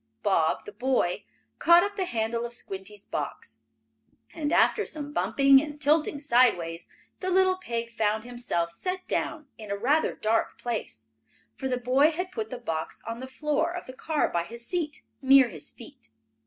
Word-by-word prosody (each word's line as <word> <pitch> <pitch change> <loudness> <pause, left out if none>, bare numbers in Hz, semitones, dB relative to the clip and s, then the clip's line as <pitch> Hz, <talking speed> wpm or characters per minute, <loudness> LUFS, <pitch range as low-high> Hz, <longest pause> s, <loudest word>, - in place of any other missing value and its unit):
Bob, 165 -6 +2
the - - -8
boy, 230 -4 0 0.3
caught 340 +1 +7
up 410 0 -3
the 385 -2 -1
handle 230 -4 -1
of 240 0 -5
Squinty's 195 -1 -8
box, 110 -6 -5 0.7
and, 305 -3 -2
after 430 - +4
some 295 -4 -6
bumping 275 -2 +5
and 295 0 -7
tilting 300 0 +2
sideways, 235 - +2 0.3
the 370 - -2
little 370 0 +3
pig 235 -9 -4
found 220 -1 0
himself 240 -9 -2
set 365 - -4
down 310 -2 -2
in 215 -2 -9
a 200 - -1
rather 285 +9 +2
dark 225 +1 0
place, 220 - -4 0.5
for 265 - -4
the 250 -1 0
boy 255 +5 +4
had 360 +3 -3
put 220 0 -4
the 250 - -5
box 165 -10 -4
on 230 +1 -5
the 260 - -6
floor 300 +4 -1
of 355 0 -6
the 255 - -9
car 305 +3 0
by 170 - -1
his 235 +6 -8
seat, 320 -3 -3 0.2
near 265 -2 +6
his 160 -7 -8
feet. 110 - -14
250 Hz, 175 wpm, -27 LUFS, 215-305 Hz, 0.7 s, caught